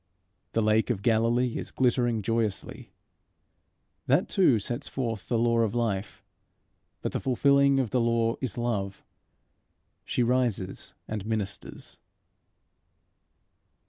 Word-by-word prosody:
The 115 - +2
lake 110 +2 +2
of 100 -5 -1
Galilee 115 +1 +2
is - - -6
glittering 120 -3 +1
joyously. 115 -2 -2 1.2
That - - +3
too 170 -11 +4
sets 120 +4 -4
forth 115 -6 -3
the 120 - +2
law 115 0 +2
of 115 0 +1
life. 110 -4 -2 0.8
But - - -1
the - - -2
fulfilling 140 +1 +3
of 125 -5 -1
the 125 - +2
law 115 0 +1
is 130 -6 -3
love: 105 -5 -2 1.0
she 125 - 0
rises 120 -6 -1
and 105 -2 -4
ministers. 105 -3 -4
115 Hz, 115 wpm, -27 LUFS, 110-125 Hz, 1.2 s, too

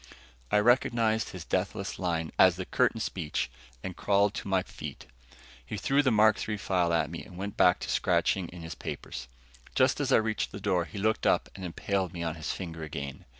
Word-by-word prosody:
I - - +3
recognized 115 -1 +3
this 90 -3 -8
deathless 95 +2 -2
line 85 -3 -1
as 95 -2 +7
the 95 +1 -4
curtain 125 +1 +1
speech 85 -8 -2 0.3
and 95 -2 -5
crawled 100 0 +2
to - - -5
my 95 -1 +2
feet. - - -8 0.6
He 90 +11 -5
threw 135 +8 +3
the 135 - +3
Mark 110 -1 +4
III 105 - -1
file 90 -3 +1
at 80 -2 +1
me 85 - -6
and 90 - -12
went 100 +2 -4
back 90 - +5
to - - -4
scratching 95 -3 +2
in 85 -1 -10
his 80 +1 -5
papers. - - -6 0.5
Just - - +3
as - - 0
I - - +7
reached 110 -1 0
the - - -7
door, 95 -4 +1
he 105 - -10
looked 110 +2 +1
up - - +2
and 95 - -9
impaled 95 +1 -2
me 85 -1 -4
on 80 -1 -1
his 80 -1 -4
finger 85 -3 -6
again. 70 -3 -6
95 Hz, 205 wpm, -29 LUFS, 85-105 Hz, 0.6 s, as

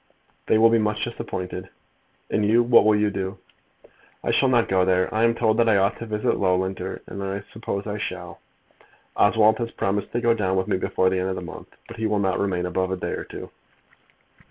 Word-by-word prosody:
"They - - +4
will 115 +1 +5
be 115 - +4
much 105 0 -1
disappointed." 95 -5 -5 0.6
"And 105 - +1
you? 115 +3 +4
what 120 -2 +5
will 110 0 +5
you 105 0 +1
do?" 95 -1 -4 0.9
"I - - 0
shall 135 - +3
not 120 -3 +3
go 95 -1 +2
there. 95 0 +1
I 110 +1 +1
am 115 0 +2
told 110 -2 +1
that 115 -1 +4
I 105 - +4
ought 100 +1 +1
to 115 - -6
visit 105 -1 0
Loughlinter, 95 0 -1
and 100 - -7
I 100 +1 -4
suppose 105 -3 -4
I 105 0 -4
shall. 90 -4 -6 0.8
Oswald 110 +2 +4
has 115 -1 -2
promised 100 -2 -2
to 120 - +1
go 120 -1 +3
down 95 -4 -1
with 95 - 0
me - - +1
before 95 0 +1
the 95 - 0
end 95 +1 -1
of 95 - -2
the - - -6
month, - - -9 0.2
but 115 - -10
he 110 0 -1
will 105 -1 0
not 95 -2 0
remain 90 -3 -1
above 95 +1 -1
a 95 - -2
day - - -4
or - - -4
two." - - -9
100 Hz, 225 wpm, -24 LUFS, 95-110 Hz, 0.9 s, will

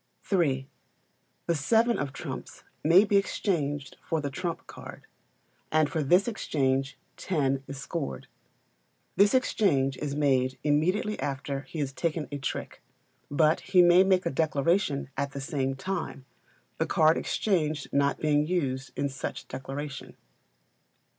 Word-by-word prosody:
iii. 135 -8 +2 0.8
The 170 - +1
seven 225 +10 +2
of 140 -1 -2
trumps 135 - -7 0.2
may 170 +6 +7
be 205 -1 +3
exchanged 145 -8 -1
for 165 - -1
the 145 -2 -3
trump 170 +3 -4
card, - - -11 0.7
and 155 -1 +3
for 160 - 0
this 180 - +4
exchange 135 - -1 0.2
ten 135 -6 0
is 140 - -7
scored. 65 - -4 0.9
This 205 +4 +5
exchange 140 - +2
is 145 -2 -3
made 130 -3 +2
immediately 180 +8 +1
after 135 0 -3
he - - -7
has 140 -3 -2
taken 160 0 -2
a 145 - -4
trick, 135 - -5 0.5
but 155 +2 +3
he 180 -2 +4
may 175 +2 +7
make 190 -1 +2
a 170 - 0
declaration 150 0 +1
at 140 0 -2
the 140 - -5
same 135 -2 -2
time, 160 -4 -4 0.5
the - - +1
card 155 +1 +4
exchanged 155 -8 0
not 140 0 +2
being 150 -1 +2
used 135 -7 -1
in 140 - +1
such 135 0 -6
declaration. 135 +1 -6
150 Hz, 140 wpm, -28 LUFS, 135-175 Hz, 0.9 s, may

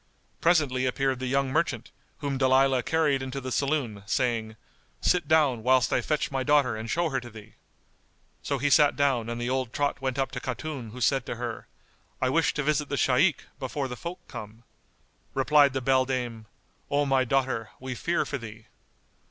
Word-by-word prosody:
Presently 145 -6 +2
appeared 135 0 0
the 130 - -3
young 135 +1 +1
merchant, 155 +4 -1 0.3
whom 140 -2 -2
Dalilah 130 0 +4
carried 160 -4 +1
into 130 +1 -4
the 130 -1 -6
saloon, 135 -7 -1
saying, 115 -2 -1 0.4
"Sit 175 -4 +1
down, 145 -7 +3
whilst 130 +1 +3
I - - +2
fetch 150 -2 -1
my 135 -1 -1
daughter 140 -3 +3
and 110 +1 -6
show 170 +5 +1
her 135 -2 -1
to 120 -1 -10
thee." 110 -2 -13 0.9
So 140 - -2
he 145 +2 0
sat 145 +2 +5
down 130 -5 +1
and 120 0 -4
the 120 +1 -2
old 130 -3 -1
trot 145 +1 -1
went 130 -1 -2
up 135 -2 0
to 125 - -4
Khatun 130 -2 -5
who 125 +4 -9
said 135 0 +2
to - - -3
her, 120 -1 -5 0.5
"I 130 - +1
wish 160 +4 +2
to 150 - -1
visit 150 0 0
the 140 - -1
Shaykh, 135 +5 +3 0.2
before 135 +1 -3
the 125 - -6
folk 175 +5 -8
come." 110 +2 -9 0.7
Replied 140 +1 +4
the 135 -1 -2
beldame, 125 -4 0 0.4
"O 145 +1 +2
my 135 -1 +3
daughter, 130 -3 0
we 130 0 -5
fear 170 +7 -1
for 140 - -4
thee." 110 -1 -10
130 Hz, 185 wpm, -27 LUFS, 125-145 Hz, 0.9 s, sat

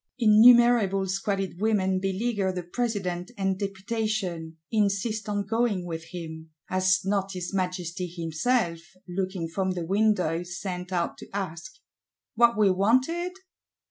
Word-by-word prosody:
Innumerable 230 -3 +6
squalid 195 -1 -2
women 190 -4 +2
beleaguer 195 +1 -1
the 180 -1 -4
President 185 -3 -2
and 190 -1 0
Deputation; 195 -5 -3
insist 215 0 0
on 205 -1 -1
going 220 -4 0
with 165 -2 -5
him: 160 -2 -8 0.2
has 185 +1 +2
not 195 -1 0
his 180 0 -5
Majesty 180 -1 -2
himself, 170 +3 -1 0.3
looking 185 -1 -3
from 185 +3 -1
the 175 -2 -4
window, 190 -4 +1
sent 180 +1 -6
out 175 -2 -1
to - - -11
ask, 185 -2 -5 0.6
What 235 -1 +4
we 205 -3 +5
wanted? 260 - +1
190 Hz, 125 wpm, -26 LUFS, 180-215 Hz, 0.6 s, Innumerable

